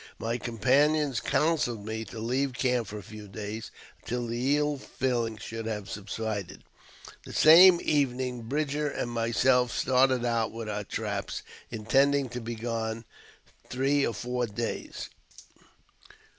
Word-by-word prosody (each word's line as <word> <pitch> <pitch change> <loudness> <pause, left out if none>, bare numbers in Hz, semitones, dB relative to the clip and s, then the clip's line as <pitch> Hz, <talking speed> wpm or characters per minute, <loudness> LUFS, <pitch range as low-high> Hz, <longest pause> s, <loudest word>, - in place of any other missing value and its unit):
My 115 +2 -2
com 120 -1 -6
panions 145 +3 +3
counselled 135 -10 +1
me 110 +1 -3
to 110 - -10
leave 130 +4 -1
camp 125 -3 0
for 105 - -6
a 105 - -8
few 105 +1 -10
days 105 +2 -6 0.3
until 120 0 -3
the 125 +5 +1
ill 150 -1 0
feeUng 120 -5 -2
should 115 +2 -6
have 105 -2 -4
subsided. 105 -1 -5 0.6
The - - -10
same 175 +3 +8
evening 130 -4 0
Captain 115 -1 -9
Bridger 150 +1 0
and 120 -3 -3
myself 120 +2 +2
started 130 0 +2
out 115 -2 0
with 115 -1 -6
our 105 -1 -3
traps, 100 -1 -4 0.3
intending 135 +4 +2
to 120 +1 -5
be 115 +1 -5
gone 115 0 -3 0.6
three 135 +2 +1
or 115 - -1
four 125 0 -2
days. 115 +2 -5
120 Hz, 145 wpm, -28 LUFS, 110-135 Hz, 0.6 s, same